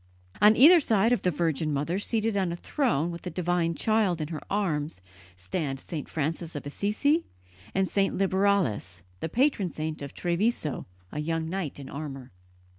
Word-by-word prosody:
On 210 +1 +7
either 325 +9 +9
side 225 -5 +2
of 245 - +1
the 180 - +2
Virgin 160 -2 0
Mother, 150 +6 -1
seated 220 0 0
on 190 -3 +1
a - - -2
throne 175 - 0
with 170 - -7
the 180 - -5
Divine 175 -2 0
Child 215 -5 +1
in 155 -1 -3
her 160 -3 -5
arms, 160 - -1 0.4
stand 135 - -3
St. 150 +1 -6
Francis 160 +2 -3
of 145 - -5
Assisi, 215 - +1 0.5
and 190 0 +2
St. 195 +1 +1
Liberalis, 190 - +1 0.2
the 160 - -3
patron 240 - +2
saint 155 -1 -4
of 140 - -7
Treviso, 175 - -1 0.2
a 150 - -4
young 165 +1 -1
knight 180 -7 -3
in 140 - -8
armour. 135 -3 -7
170 Hz, 170 wpm, -27 LUFS, 150-200 Hz, 0.5 s, either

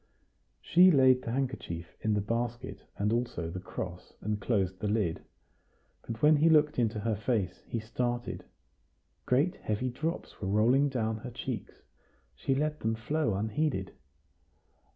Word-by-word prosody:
She 180 +2 +7
laid 130 -5 +5
the 115 - -4
handkerchief 120 -11 -3
in 110 -1 +1
the 105 - +1
basket, 120 +3 -3 0.2
and 105 +2 +1
also 115 -9 -2
the 90 - -5
cross, 90 -1 -7
and 105 0 -2
closed 95 -5 0
the 105 - -2
lid. 100 -6 0 0.8
But 115 +2 -7
when 150 0 +7
he 160 +3 +5
looked 150 -3 +4
into 110 -3 +1
her 110 0 0
face, 105 -4 -1
he 115 - -2
started. 120 +2 -3 0.8
Great 150 +9 +2
heavy 115 +4 -2
drops 155 +7 -4
were 95 - -2
rolling 120 +8 +4
down 110 -4 -1
her 120 +3 -7
cheeks; 125 -3 -6 0.5
she 100 - -1
let 150 +2 -1
them 110 0 0
flow 115 0 0
unheeded. 110 -1 -1
115 Hz, 150 wpm, -30 LUFS, 105-135 Hz, 0.8 s, She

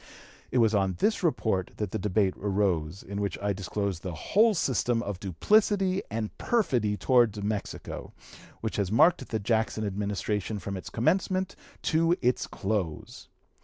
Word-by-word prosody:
It - - -1
was 115 -2 +4
on 95 -3 +1
this 215 - +1
report 110 - 0
that 105 -3 -3
the 110 - -2
debate 100 -2 +1
arose, 95 -4 0
in 100 +1 -4
which 100 -3 -2
I 100 0 -1
disclosed 95 -1 -3
the 90 -2 -5
whole 215 - +3
system 120 - +1
of 100 -4 -4
duplicity 195 - +2
and 110 0 -3
perfidy 120 - +1
towards 115 -5 +3
Mexico, 105 0 -4 0.5
which 110 - -3
had 100 -2 0
marked 130 +4 +4
the 110 - 0
Jackson 110 0 0
Administration 105 +1 -2
from 100 0 -5
its 95 - -7
commencement 185 +8 0 0.3
to 165 +2 +3
its 125 0 +1
close. 95 -6 -3
105 Hz, 150 wpm, -28 LUFS, 100-125 Hz, 0.5 s, was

